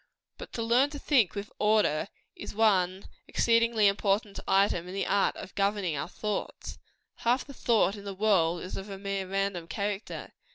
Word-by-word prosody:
But - - -9
to 230 - -2
learn 245 +5 +3
to 290 - -7
think 250 - +2
with 205 +1 -5
order, 210 -7 +2 0.3
is - - -8
one 190 -4 +2 0.2
exceedingly 230 -2 +3
important 200 +1 +1
item 195 -3 +2
in 185 - -7
the 195 - -1
art 200 0 +2
of - - -9
governing 200 -4 0
our 145 +4 -4
thoughts. 210 +1 -4 0.4
Half 245 +3 +1
the 280 - -10
thought 220 -6 +2
in 200 - -10
the 200 -1 -6
world 185 -5 +2
is 185 - -6
of 195 +2 -7
a 195 - -6
mere 195 -1 -3
random 195 -3 -1
character. 200 +5 -4
200 Hz, 175 wpm, -29 LUFS, 190-220 Hz, 0.4 s, learn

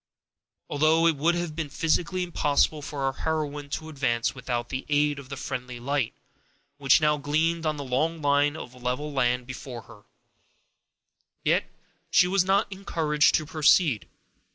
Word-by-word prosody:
Although 155 +3 +3
it 165 -2 +4
would 165 +5 +2
have 175 -3 -3
been 160 -3 -3
physically 165 +4 0
impossible 150 -3 +1
for 145 -1 -5
our 135 0 0
heroine 150 -2 -3
to 155 +2 -4
advance 125 -6 -1
without 120 -2 -4
the 130 +1 -4
aid 145 0 +2
of 135 -2 -12
the 140 - -6
friendly 125 -3 -5
light, 130 -1 -1 0.6
which 135 +2 +4
now 150 0 +3
gleamed 160 +3 0
on 155 -1 -1
the 145 - -5
long 155 +6 -1
line 145 0 +2
of 125 -5 -8
level 125 +4 -3
land 125 -2 +1
before 125 -2 -8
her, 105 - -16 1.4
yet - - +1 0.4
she 195 -2 +5
was 190 0 +2
not 195 +3 +2
encouraged 160 -6 +1
to 155 - 0
proceed. 150 - +3
145 Hz, 155 wpm, -26 LUFS, 135-160 Hz, 1.4 s, she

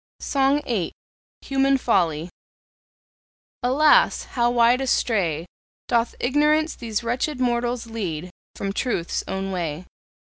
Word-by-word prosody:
SONG 275 +1 +1
VIII. 210 -9 -2 0.5
HUMAN 275 0 +2
FOLLY. 175 - 0 1.3
Alas! 305 - +4
how 240 -1 0
wide 240 +1 +4
astray 190 - 0 0.4
Doth 235 -1 +1
Ignorance 300 +4 +2
these 230 -1 -4
wretched 250 +4 -2
mortals 240 -1 0
lead 180 -7 -5 0.2
From 195 -1 -3
Truth's 205 -8 -2
own 195 0 -3
way! 170 -2 -3
235 Hz, 105 wpm, -23 LUFS, 190-265 Hz, 1.3 s, Alas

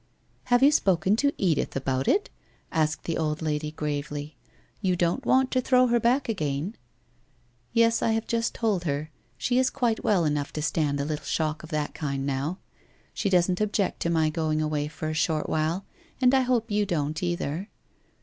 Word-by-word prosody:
'Have 245 +1 +3
you 285 - +7
spoken 190 - +3
to 285 +3 +2
Edith 175 -6 0
about 135 0 -1
it?' 410 - +2 0.4
asked 155 -2 0
the 165 - -2
old 155 -1 -1
lady 150 -1 -1
gravely. 150 -1 -4 0.2
' - - -35
You 185 -3 +1
don't 175 +9 0
want 260 0 +3
to 255 - +2
throw 255 0 +4
her 240 -1 +3
back 245 +4 +2
again? 160 -1 -2 0.3
' 125 +1 -38
* 120 0 -39
Yes, 230 0 +3
I 225 - +2
have 225 0 -1
just 230 0 -1
told 210 -6 0
her. 150 +1 -2 0.3
She 245 - +1
is 260 0 +3
quite 230 -3 -1
well 185 -6 +3
enough 145 -1 -1
to 155 - -3
stand 150 -3 0
a 140 - -1
little 150 0 -3
shock 155 -1 -1
of 155 - -11
that 150 -2 -2
kind 140 -3 -3
now. 140 +6 -2 0.6
She 200 - -1
doesn't 180 +1 +2
object 205 -2 0
to 170 - -1
my 160 -2 +2
going 155 -1 0
away 150 -1 -1
for 155 +1 -6
a 155 - -2
short 155 0 0
while, 160 +5 -1 0.3
and 255 0 +4
I 265 - +5
hope 245 -3 0
you 205 0 +1
don't 155 -2 -1
either?' 175 +1 -2
165 Hz, 200 wpm, -26 LUFS, 150-220 Hz, 0.6 s, you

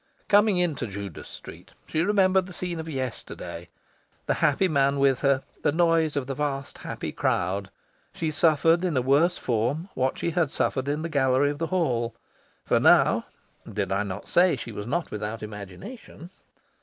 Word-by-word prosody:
Coming 205 -1 +4
into 160 -9 0
Judas 100 -3 -7
Street, - - -12
she 155 - -1
remembered 190 -1 +3
the 180 - -10
scene 175 -1 -4
of 160 0 -6
yesterday 125 - -6 0.6
the - - +1
happy 165 +7 +3
man 140 -3 +2
with 135 -2 +3
her, 140 -1 +2 0.2
the - - +2
noise 165 -1 +2
of 140 -3 -1
the 135 - -3
vast 140 -1 -3
happy - - -5
crowd. 95 +2 -1 0.4
She 160 -2 -2
suffered 165 +1 +3
in 170 -7 0
a - - +3
worse 150 +7 +3
form 125 - -1
what 130 +1 0
she 170 - -1
had 165 -3 +1
suffered 130 -1 -1
in 150 +2 -1
the - - -1
gallery 140 -2 +2
of 145 - -7
the 165 - -1
Hall. 120 -11 0 0.5
For - - +3
now - - +5 0.5
did 100 -1 -2
I 95 +1 +1
not 100 -1 -5
say 175 -2 +4
she 120 -2 -7
was 105 0 -6
not 170 +6 -2
without 105 +1 -4
imagination? 110 - -9
145 Hz, 175 wpm, -26 LUFS, 120-170 Hz, 0.6 s, now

